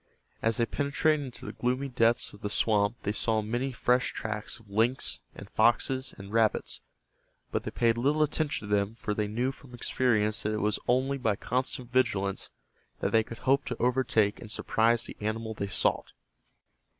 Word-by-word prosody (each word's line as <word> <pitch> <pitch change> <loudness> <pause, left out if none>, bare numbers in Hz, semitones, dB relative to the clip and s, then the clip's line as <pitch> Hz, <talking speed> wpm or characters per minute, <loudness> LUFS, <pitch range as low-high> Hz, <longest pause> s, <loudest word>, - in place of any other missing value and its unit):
As 115 -1 +1
they 115 - +3
penetrated 145 +4 +1
into 125 - -9
the - - -4
gloomy 125 +3 -1
depths 120 -2 +1
of 105 - -14
the 105 - -2
swamp 105 +1 +2
they 100 - 0
saw 110 0 0
many 120 +5 -2
fresh 125 +1 +1
tracks 110 -2 -4
of 110 - -20
lynx, 115 +6 +1 0.2
and - - -9
foxes 130 +4 +2
and 100 +1 -10
rabbits, 115 -2 +1 0.7
but - - 0
they - - -5
paid 115 0 +1
little 145 +5 +3
attention 150 -6 -1
to 105 - -1
them 100 +2 0
for 105 - -3
they 105 0 -1
knew 120 +5 -1
from 135 -2 -14
experience 110 -4 +1
that 105 - -1
it 105 - -1
was 105 0 +1
only 135 +3 +2
by 110 -5 +1
constant 125 +2 -2
vigilance 100 -6 +1 0.5
that - - -1
they 115 - +5
could 115 +1 -8
hope 135 +1 +4
to 125 - -4
overtake 120 -4 +2
and 110 - -9
surprise 115 +2 +2
the - - -8
animal 110 +1 -2
they 100 -2 -3
sought. 95 - +1
115 Hz, 185 wpm, -29 LUFS, 105-130 Hz, 0.7 s, they